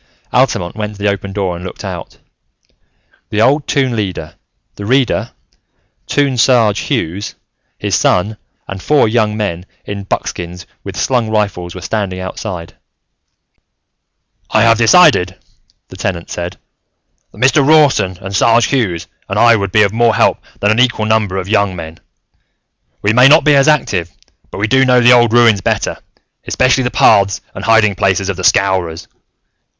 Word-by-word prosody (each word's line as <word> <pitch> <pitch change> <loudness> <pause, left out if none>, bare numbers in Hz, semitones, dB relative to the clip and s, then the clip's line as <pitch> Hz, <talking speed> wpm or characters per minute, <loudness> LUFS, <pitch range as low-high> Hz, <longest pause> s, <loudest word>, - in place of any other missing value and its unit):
Altamont 85 +2 0
went 105 -1 -5
to 100 - -10
the - - +2
open 100 0 -4
door 95 -3 -3
and 85 - -9
looked 95 - -8
out. - - -8 1.1
The 105 - -2
old 140 +6 +2
Toon 130 -4 0
Leader, 95 -7 -4 0.4
the 100 - -8
Reader, 130 +1 +1 0.8
Toon 140 -4 0
Sarge 115 -4 +3
Hughes, 95 +6 -3 0.4
his - - -4
son 105 +4 +1 0.3
and 95 -1 -7
four 150 0 +2
young 110 -1 0
men 90 -5 -3 0.2
in 100 -1 -6
buckskins 90 -2 -5 0.2
with - - -8
slung 120 -4 0
rifles 100 -5 -2
were 95 - -8
standing 100 -3 -3
outside. 95 -2 -7 1.8
"I 110 - +2
have 115 0 +3
decided," 115 - +4 0.5
the - - -12
Tenant 85 -3 -4
said, 85 +1 -5 0.7
"that - - -19
Mr. 135 +5 +3
Rawson 140 - +3
and 95 +1 -6
Sarge 115 +3 +3
Hughes 105 -12 -1 0.2
and - - -3
I 120 -1 +5
would 100 -3 -3
be 105 +1 +4
of 100 0 0
more 115 -1 +2
help - - +2 0.2
than 105 - +2
an 110 - +1
equal 125 -3 +1
number 110 -3 0
of 95 -1 -4
young 100 -3 0
men. 80 -1 -9 1.0
We 105 +1 +2
may 125 +3 +6
not 155 +4 +5
be 150 -2 +4
as 140 +1 +3
active, 105 - +1 0.4
but - - -9
we 100 - 0
do 130 +4 +2
know 125 -1 +3
the 120 0 +5
old 120 -2 +4
ruins 115 -4 +4
better, - - -2 0.5
especially 130 0 +1
the - - 0
paths 100 -4 +3
and 95 - -8
hiding 115 -2 +3
places 95 0 0
of 100 - -2
the 95 - -6
Scowrers. 90 -3 0
105 Hz, 165 wpm, -14 LUFS, 95-120 Hz, 1.8 s, may